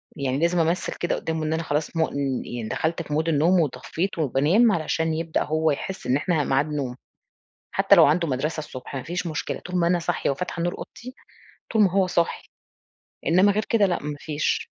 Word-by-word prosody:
يعني 135 -1 -1
لازم 170 +2 +2
أمثِّل 170 +2 0
كده 175 - 0
قدّامه 160 -1 -3
إن 155 - 0
أنا 165 +1 -1
خلاص 150 +2 -2
م - - -1 0.5
يعني 120 -2 -5
دخلت 165 +1 -1
في 150 -2 -6
Mood 155 +2 0
النوم 165 +4 +3
وطفِّيت 160 +6 -2
وبانام، 155 - +3
علشان 160 -2 0
يبدأ 160 0 -1
هو 155 +1 +1
يحسّ 185 +3 -5
إن 125 +2 +3
إحنا 155 +1 0
ميعاد 135 +1 +2
نوم، 140 -5 -3 0.8
حتى - - +5
لو - - +8
عنده 165 +3 +2
مدرَسَة 145 +5 -2
الصُبح، 145 -3 -7
ما 130 - -3
فيش 175 +4 -4
مشكلة، 155 -2 -3
طول 180 0 -4
ما 170 -1 +2
أنا 175 +1 +3
صاحية 170 -2 -1
وفاتحة 170 +4 -3
نور 175 +1 -1
أوضتي، 255 +2 -9 0.6
طول 220 - +4
ما 195 -4 +4
هو 190 0 +2
صاحي، 170 -2 -1 0.8
إنمَّا 185 +5 +5
غير 215 +2 0
كده 215 -3 +4
لأ، 175 -2 -1
ما 150 0 -4
فيش. 150 0 -2
160 Hz, 200 wpm, -24 LUFS, 150-175 Hz, 0.8 s, لو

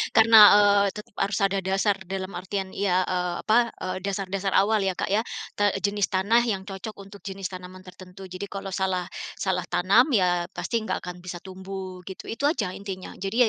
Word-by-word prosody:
karena, 225 0 +7 0.2
eee, 205 -1 +5
tetap 210 -1 -11
harus 200 +1 0
ada 195 0 +2
dasar 195 +2 +1
dalam 190 0 -4
artian 190 +1 -4
ya, 190 -1 +1
eee, 180 -1 -1
apa, 235 +2 +2
eee, 185 0 -3
dasar-dasar 195 0 -2
awal 215 +2 +2
ya, 190 - +1
Kak, - - -3
ya. 205 +3 +2 0.4
Ta 205 -1 +2
jenis 205 0 +1
tanah 205 +6 +3
yang 205 -5 -1
cocok 195 +3 -6
untuk 200 +1 -13
jenis 195 -1 -5
tanaman 185 0 -10
tertentu, 185 +1 -12
jadi 185 +2 -6
kalau 195 0 -6
salah 190 -2 -1 0.4
salah 185 -2 0
tanam 185 +8 +4
ya 180 -4 +2
pasti 235 - -2
enggak - - -2
akan 180 0 -7
bisa 180 -1 -6
tumbuh 190 -1 -8
gitu. 190 - -9
Itu 230 +5 -2
aja 335 - -2
intinya 195 -2 -7
jadi 195 +2 -4
195 Hz, 185 wpm, -25 LUFS, 185-200 Hz, 0.4 s, karena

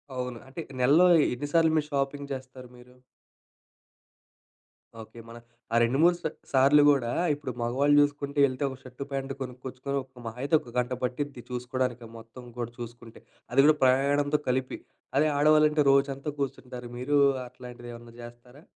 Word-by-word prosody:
అవును. 125 -1 -4
అంటే 135 +5 -7 0.2
నెలలో 145 +8 +5 0.3
ఎన్ని 140 +4 -5
సార్లు 165 -1 +4
మీరు 150 -1 0
షాపింగ్ 140 0 -2
చేస్తారు 130 -1 -9
మీరు? 125 +1 -17 2.1
ఓకే. 110 +1 -13
మన 115 - -10 0.4
ఆ - - +2
రెండు, 120 +3 +1
మూడు 175 +1 +5
స్ - - -25 0.3
సార్లు 140 +2 +5
కూడా 125 -4 0 0.2
ఇప్పుడు 145 -2 -5
మగవాళ్ళు 135 +5 +2
చూసుకుంటే 145 0 -1
వెళ్తే 130 +1 -3
ఒక 130 - -9
షర్ట్ 130 +1 -8
ప్యాంట్ 135 0 -3
కొనుక్కొచ్చుకొని, 130 +2 -5
ఒక 130 -1 -17
మహా 115 +2 -8
అయితే 145 +3 +2
ఒక 125 -6 -14
గంట 125 0 0
పట్టిద్ది 130 +1 -3
చూసుకోవడానికి 125 -1 -3
మొత్తం 115 +2 -13
కూడా 120 -1 -4
చూసుకుంటే. 120 -1 -10 0.3
అది 125 - +2
కూడా 155 0 +6
ప్రయాణంతో 140 +3 +2
కలిపి 130 0 -1 0.4
అదే 150 +2 +4
ఆడవాళ్ళంటే 150 0 +4
రోజంతా 140 +1 +1
కూర్చుంటారు. 125 -3 -5
మీరు 130 +4 -1 0.3
అట్లాంటిది 125 -1 -11
ఏమన్నా 115 0 -13
చేస్తారా? 120 +3 -14
130 Hz, 150 wpm, -27 LUFS, 125-145 Hz, 2.1 s, కూడా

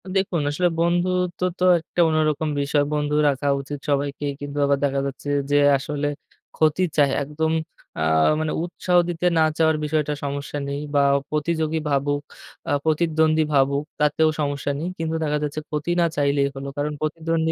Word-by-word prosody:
দেখুন, 190 -4 +1
আসলে 175 +5 +1
বন্ধুত্ব 175 +1 0 0.2
তো - - 0 0.2
একটা 165 +2 -8
অন্যরকম 155 -1 +1
বিষয়। 145 +1 +1
বন্ধু 150 0 0
রাখা 140 0 -2
উচিত 145 +1 -6
সবাইকেই 140 0 -1
কিন্তু 145 0 -6
আবার 140 0 +2
দেখা 140 -1 +1
যাচ্ছে 140 +1 -5 0.2
যে - - +3 0.2
আসলে 145 +1 -3 0.5
ক্ষতি 155 +3 +2
চায় 145 -2 +4
একদম 155 +3 -2 0.5
আ - - -3 0.4
মানে 155 -1 -1
উৎসাহ 180 +1 0
দিতে 175 0 -3
না - - +4 0.2
চাওয়ার 160 -1 +3
বিষয়টা 150 -1 0
সমস্যা 140 +1 -4
নেই 140 0 -3 0.2
বা - - +5 0.3
প্রতিযোগী 160 +1 -1
ভাবুক 145 +1 0 0.5
আ - - 0
প্রতিদ্বন্দ্বী 160 0 +2
ভাবুক 140 +1 +2 0.2
তাতেও 155 +1 +3
সমস্যা 145 -1 -1
নেই 165 - -3
কিন্তু 165 0 -2
দেখা 150 -1 0
যাচ্ছে, 150 +1 -3
ক্ষতি 150 +3 -2
না 170 - +4
চাইলেই 140 -1 +2
হল। 135 0 -6
কারণ 150 +1 -1
প্রতিদ্বন্দ্বী 160 +1 -1
150 Hz, 160 wpm, -23 LUFS, 145-160 Hz, 0.5 s, বা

